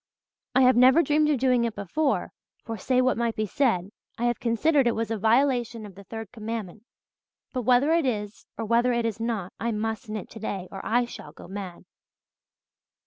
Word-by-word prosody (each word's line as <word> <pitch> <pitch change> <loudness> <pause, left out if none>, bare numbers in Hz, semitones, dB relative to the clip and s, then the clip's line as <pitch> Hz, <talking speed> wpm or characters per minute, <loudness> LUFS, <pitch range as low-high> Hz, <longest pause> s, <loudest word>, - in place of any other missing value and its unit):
I 260 - +6
have 255 0 +6
never 260 +7 +6
dreamed 300 -1 +2
of 295 - +2
doing 250 -1 +2
it 230 -2 -2
before 270 - -1 0.3
for, 225 - -4
say 255 +5 +1
what 255 -2 +1
might 235 -1 0
be 215 - -1
said, 200 -5 0 0.3
I 235 - -1
have 240 -2 0
considered 260 +4 +2
it 235 - +1
was 225 0 -2
a - - +1
violation 235 0 +2
of 200 - -11
the 200 +2 -13
third 225 0 -7
commandment. 220 -3 -6 0.7
But 255 - -1
whether 255 +5 +4
it 330 -5 +2
is 210 -3 -4
or 225 - -3
whether 235 +3 +3
it 235 -1 0
is 225 -1 -2
not 225 -5 -3
I 235 - -1
must 220 +2 -3
knit 215 -2 -5
today 200 -4 -5
or 195 - -7
I 240 +2 +2
shall 150 -10 -10
go - - -12
mad." 190 -2 -7
230 Hz, 195 wpm, -26 LUFS, 215-255 Hz, 0.7 s, I